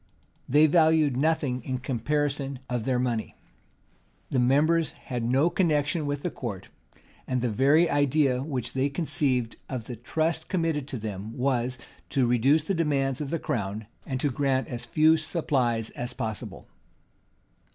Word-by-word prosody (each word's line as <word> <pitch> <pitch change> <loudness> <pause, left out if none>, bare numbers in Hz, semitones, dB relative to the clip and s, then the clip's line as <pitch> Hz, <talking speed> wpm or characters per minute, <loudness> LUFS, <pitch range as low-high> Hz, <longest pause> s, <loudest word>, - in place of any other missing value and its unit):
They 150 +4 +6
valued 155 -3 +4
nothing 140 -3 +1
in 130 +2 -3
comparison 140 +2 -1
of 120 -3 -2
their 130 -2 +1
money: 120 -3 -2 1.0
the 130 - +2
members 150 +6 +3
had 125 -2 -5
no 135 +8 +2
connection 155 -3 +1
with 145 0 -3
the 180 - -1
court; 105 -7 -6 0.6
and 130 -1 0
the 120 -1 -1
very 140 +9 +4
idea 145 -3 +2
which 130 -4 -3
they 135 +2 +1
conceived 135 -6 -1
of 125 -4 -4
the 125 - -6
trust 160 +7 -2
committed 165 -6 0
to 135 - -4
them, 105 0 -6
was, 125 -1 0 0.3
to 135 -2 +2
reduce 130 +6 +3
the 195 - -1
demands 140 -5 0
of 145 - -3
the 165 - 0
crown, 105 -6 -3 0.2
and 130 -1 -2
to 145 - +1
grant 135 0 0
as 120 -2 -5
few 160 +1 +4
supplies 135 -8 0
as 120 0 -4
possible. 110 -4 -5
135 Hz, 150 wpm, -27 LUFS, 125-150 Hz, 1.0 s, They